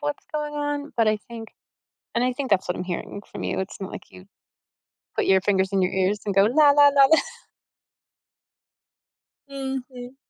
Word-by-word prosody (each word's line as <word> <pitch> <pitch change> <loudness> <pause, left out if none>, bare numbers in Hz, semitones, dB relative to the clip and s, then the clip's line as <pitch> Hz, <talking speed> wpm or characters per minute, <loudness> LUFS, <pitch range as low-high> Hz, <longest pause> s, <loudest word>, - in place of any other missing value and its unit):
what's 290 -1 -4
going 300 -1 -3
on, 290 0 -3
but 225 -2 +3
I 215 0 +1
think 225 -2 -8 0.7
and 235 - +1
I 255 - +1
think 265 +1 -5
that's 190 -2 +2
what 180 - -1
I'm - - -4
hearing 185 +3 -6
from - - -7
you, - - -2
it's 190 +1 -7
not 195 - -6
like - - -8
you 185 +1 -15 0.9
put - - 0
your 190 0 +4
fingers 190 -1 +1
in 195 - +1
your 185 - +1
ears, 190 +2 0
and 200 -2 -2
go, 195 - +6
la, 285 +7 +5
la, 290 0 +6
la, 275 -1 +6
la 320 +3 +5 2.3
Mhm. 265 -2 -6
245 Hz, 185 wpm, -24 LUFS, 195-285 Hz, 2.3 s, go